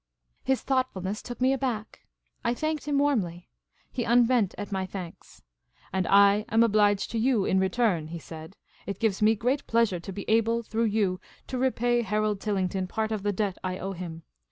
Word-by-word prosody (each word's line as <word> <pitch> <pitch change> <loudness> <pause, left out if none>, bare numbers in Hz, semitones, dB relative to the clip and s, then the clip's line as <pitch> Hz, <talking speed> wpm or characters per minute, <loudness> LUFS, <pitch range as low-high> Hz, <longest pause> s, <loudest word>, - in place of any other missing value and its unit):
His 265 -1 +1
thoughtfulness 215 -7 -1
took 245 - -8
me 260 +1 +3
aback. 245 -5 -4 0.4
I 235 0 +1
thanked 310 +1 -2
him 290 -1 +1
warmly. 205 -12 0 0.4
He 245 - -2
unbent 235 -3 +3
at 205 0 -6
my 190 -1 -2
thanks. 185 -3 -9 0.2
" - - -31
And 190 -2 0
I 200 +1 +5
am 225 +1 +4
obliged 205 -3 +2
to 230 - -1
you 235 -4 +2
in 190 - +2
return," 190 -4 +1
he 170 +2 -6
said. 160 +3 -10 0.2
" - - -29
It 200 - -3
gives 215 -4 0
me 220 +1 +4
real 255 +4 +2
pleasure 225 -6 +2
to 170 - -8
be 200 +1 -7
able, 230 +1 +2
through 225 +1 -1
you, 205 -4 +1 0.3
to 255 - -4
repay 245 -2 +2
Harold 210 -1 0
Tillington 190 -2 -1
part 220 +1 -2
of 215 -2 -2
the 205 +1 0
debt 200 -1 -2
I 185 0 -2
owe 195 +1 -4
him. 170 -2 -7
215 Hz, 195 wpm, -27 LUFS, 190-235 Hz, 0.4 s, I